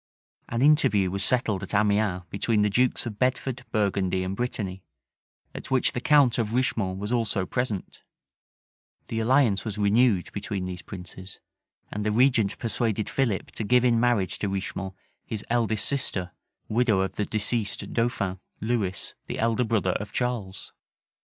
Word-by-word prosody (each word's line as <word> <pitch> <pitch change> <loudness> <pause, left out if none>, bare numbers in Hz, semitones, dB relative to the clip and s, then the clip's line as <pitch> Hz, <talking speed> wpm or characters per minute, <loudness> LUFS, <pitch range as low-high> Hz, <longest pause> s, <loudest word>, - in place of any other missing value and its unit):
An 115 +2 0
interview 105 - +4
was 100 +1 -1
settled 110 -6 +1
at - - -4
Amiens 100 -3 +2
between 105 +1 +1
the 105 - +2
dukes 125 +4 +2
of 105 -3 -6
Bedford, 130 0 0
Burgundy, 95 -3 +1
and 95 +1 -3
Brittany, 100 -5 -3 0.7
at - - -8
which 130 -1 +2
the 125 - -3
count 135 -4 +4
of 110 -1 -1
Richemont 110 -7 0
was 105 +3 -4
also 110 -5 0
present:[*] 115 -3 -3 1.1
the 115 - -2
alliance 115 -3 +3
was 110 -2 -5
renewed 105 -1 +3
between 100 -2 -3
these 90 -1 -5
princes: 95 0 -9 0.5
and 105 - -3
the 105 - +1
regent 115 -3 +3
persuaded 110 -2 -1
Philip 120 -8 0
to - - -4
give 125 +3 +4
in 115 -2 +4
marriage 115 -6 +1
to 100 - -1
Richemont 95 0 -4 0.3
his 110 -2 -5
eldest 110 -3 +1
sister, 95 -10 -1 0.4
widow 110 -3 +2
of 95 - -2
the 105 - 0
deceased 110 -1 -1
dauphin, 115 -6 0 0.2
Lewis, 110 -5 -1
the - - -4
elder 115 +2 +1
brother 110 -5 +1
of 100 +3 -4
Charles. 120 -7 -3
110 Hz, 155 wpm, -26 LUFS, 95-120 Hz, 1.1 s, interview